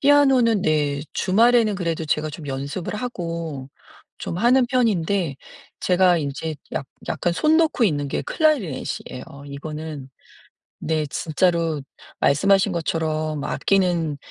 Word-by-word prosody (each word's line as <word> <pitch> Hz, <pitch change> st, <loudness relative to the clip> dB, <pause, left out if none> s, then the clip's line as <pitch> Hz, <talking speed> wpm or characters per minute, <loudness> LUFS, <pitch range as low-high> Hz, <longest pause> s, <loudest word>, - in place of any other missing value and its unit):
피아노는 265 Hz, -7 st, +4 dB
네 145 Hz, -2 st, +1 dB
주말에는 225 Hz, +2 st, +3 dB
그래도 165 Hz, -3 st, -2 dB
제가 155 Hz, 0 st, 0 dB
좀 150 Hz, 0 st, -9 dB
연습을 140 Hz, +8 st, -4 dB
하고 165 Hz, -, -4 dB, 0.5 s
좀 170 Hz, -, -4 dB
하는 250 Hz, +3 st, +4 dB
편인데 200 Hz, -, +1 dB, 0.4 s
제가 180 Hz, -1 st, +4 dB
인제 150 Hz, +2 st, -3 dB, 0.2 s
약 135 Hz, -, -3 dB, 0.2 s
약간 175 Hz, -, 0 dB
손 310 Hz, -, +3 dB
놓고 315 Hz, -7 st, +3 dB
있는 145 Hz, -6 st, +1 dB
게 -, -, -2 dB
클라리넷이에요. 225 Hz, -, -1 dB, 0.2 s
이거는 150 Hz, 0 st, -7 dB, 0.7 s
네. 155 Hz, -1 st, -1 dB
진짜로 165 Hz, +1 st, 0 dB, 0.4 s
말씀하신 195 Hz, +7 st, +3 dB
것처럼 155 Hz, -3 st, -2 dB
악기는 175 Hz, -6 st, +1 dB
170 Hz, 265 characters per minute, -22 LUFS, 150-205 Hz, 0.7 s, 피아노는